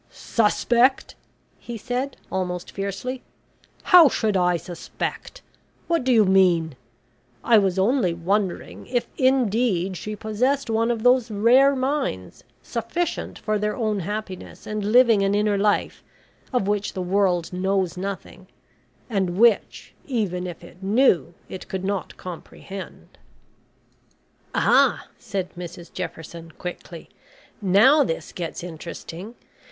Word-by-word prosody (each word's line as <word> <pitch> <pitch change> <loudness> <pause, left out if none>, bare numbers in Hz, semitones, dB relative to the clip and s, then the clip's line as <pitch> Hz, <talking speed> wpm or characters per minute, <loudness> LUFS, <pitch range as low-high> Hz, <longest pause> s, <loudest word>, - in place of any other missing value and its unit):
"Suspect!" 240 +4 +1 0.5
he 235 -1 -7
said, 250 +5 -3
almost 180 -1 -3
fiercely. 200 +6 -4 0.6
"How 355 -6 +8
should 215 -5 0
I 180 -1 +3
suspect? 175 - -6 0.4
What 335 -4 0
do 260 - +1
you 220 -4 +5
mean? 180 -5 +3 0.7
I 225 -2 +6
was 190 -2 0
only 200 -1 +2
wondering 185 +3 -2
if 245 -2 -1
indeed 230 -8 +2
she 210 +4 -5
possessed 230 +5 -1
one 225 +1 +1
of 230 -2 -1
those 250 -1 +4
rare 245 +7 +4
minds, 260 - -2 0.2
sufficient 240 +10 -3
for 215 -1 -1
their 210 0 -1
own 215 -5 -1
happiness, 195 0 -6
and 215 -1 -3
living 235 -4 +6
an 195 +1 +2
inner 210 0 +2
life 205 +1 0 0.5
of 245 -7 0
which 205 0 -1
the 185 - -3
world 180 -2 +1
knows 190 -1 0
nothing, 190 0 -6 0.6
and 190 -6 -1
which, 230 -1 +2
even 195 - -2
if 175 -1 -8
it 175 +1 -15
knew, 195 - +2
it 185 - -8
could 190 -1 -4
not 200 -1 -3
comprehend." 185 +2 -10 1.4
"Ah," - - +3
said 195 -5 -4
Mrs 175 -1 -9
Jefferson, 165 +1 -7
quickly. 175 -1 -8 0.5
"Now 215 +10 +5
this 165 -10 -4
gets 170 +1 -5
interesting. 175 +5 -8
200 Hz, 125 wpm, -23 LUFS, 180-235 Hz, 1.4 s, How